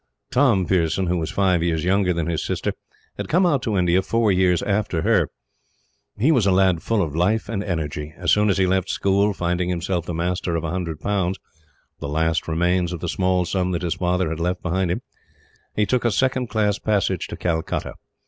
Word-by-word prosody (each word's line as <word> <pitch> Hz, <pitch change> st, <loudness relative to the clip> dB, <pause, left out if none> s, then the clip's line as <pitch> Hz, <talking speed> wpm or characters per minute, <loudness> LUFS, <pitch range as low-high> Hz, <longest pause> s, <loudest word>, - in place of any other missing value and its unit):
Tom 125 Hz, -8 st, +3 dB
Pearson, 90 Hz, +1 st, +1 dB
who 90 Hz, 0 st, 0 dB
was 80 Hz, -, -3 dB
five 95 Hz, -3 st, +2 dB
years 80 Hz, -2 st, 0 dB
younger 95 Hz, +1 st, +2 dB
than 85 Hz, -2 st, -1 dB
his 85 Hz, -1 st, -2 dB
sister, -, -, -2 dB, 0.4 s
had -, -, -4 dB
come 180 Hz, +4 st, +3 dB
out 145 Hz, -7 st, +2 dB
to 110 Hz, -4 st, -1 dB
India 90 Hz, 0 st, +3 dB
four 115 Hz, +1 st, +1 dB
years 90 Hz, -2 st, +2 dB
after 100 Hz, -5 st, 0 dB
her. -, -, +2 dB, 0.9 s
He 130 Hz, +10 st, +3 dB
was 120 Hz, -10 st, +3 dB
a -, -, +4 dB
lad 95 Hz, -3 st, +3 dB
full 110 Hz, -3 st, +1 dB
of 75 Hz, -3 st, -4 dB
life 95 Hz, +7 st, +1 dB
and 100 Hz, -3 st, -3 dB
energy. 75 Hz, -4 st, -4 dB
As -, -, 0 dB
soon 105 Hz, 0 st, +4 dB
as 95 Hz, -, +2 dB
he 95 Hz, -, +3 dB
left 95 Hz, 0 st, 0 dB
school, 100 Hz, +1 st, +2 dB
finding 90 Hz, -1 st, -1 dB
himself 90 Hz, 0 st, -2 dB
the 85 Hz, -, -3 dB
master 85 Hz, 0 st, -1 dB
of 85 Hz, -, -2 dB
a 80 Hz, -, -2 dB
hundred 85 Hz, -4 st, -4 dB
pounds 95 Hz, -2 st, 0 dB, 0.6 s
the 70 Hz, -, -5 dB
last 80 Hz, +2 st, 0 dB
remains 90 Hz, +2 st, +1 dB
of 85 Hz, -, -5 dB
the 85 Hz, -, -4 dB
small 90 Hz, 0 st, +1 dB
sum 90 Hz, +1 st, -1 dB
that 85 Hz, -, -2 dB
his 85 Hz, -, 0 dB
father 90 Hz, -1 st, 0 dB
had 80 Hz, 0 st, -4 dB
left 90 Hz, +2 st, -2 dB
behind 90 Hz, +1 st, 0 dB
him 90 Hz, -, -2 dB, 0.7 s
he 105 Hz, -, +2 dB
took 125 Hz, +4 st, 0 dB
a 120 Hz, -, +3 dB
second 130 Hz, +1 st, +1 dB
class 105 Hz, -2 st, 0 dB
passage 100 Hz, -4 st, 0 dB
to -, -, -7 dB
Calcutta. 80 Hz, -2 st, -2 dB
90 Hz, 210 wpm, -22 LUFS, 85-100 Hz, 0.9 s, a